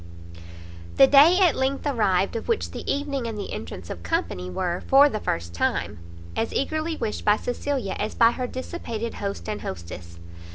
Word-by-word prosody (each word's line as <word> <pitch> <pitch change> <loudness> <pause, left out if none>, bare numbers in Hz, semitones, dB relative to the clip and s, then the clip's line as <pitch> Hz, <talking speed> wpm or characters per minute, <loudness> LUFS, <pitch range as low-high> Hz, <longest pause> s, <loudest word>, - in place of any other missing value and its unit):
The 270 - +8
day 290 +6 +7
at 355 -6 +4
length 270 +2 -1
arrived 200 -9 +1
of 230 - -4
which 460 - 0
the - - -4
evening 280 -3 -2
and 225 -2 -5
the 205 - -5
entrance 85 +3 -7
of 85 - -7
company 90 +2 -2
were, 175 - -2
for 275 +2 +7
the 215 - -3
first 85 - -3
time, 85 - -1 0.4
as 225 - -1
eagerly 315 +3 -1
wished 210 - -3
by 210 0 +4
Cecilia 245 -3 -2
as 215 - -2
by 230 -1 +5
her 250 0 -3
dissipated 235 -4 -5
host 200 -1 -5
and 210 -1 -3
hostess. 85 -1 -8
230 Hz, 175 wpm, -25 LUFS, 180-275 Hz, 0.4 s, The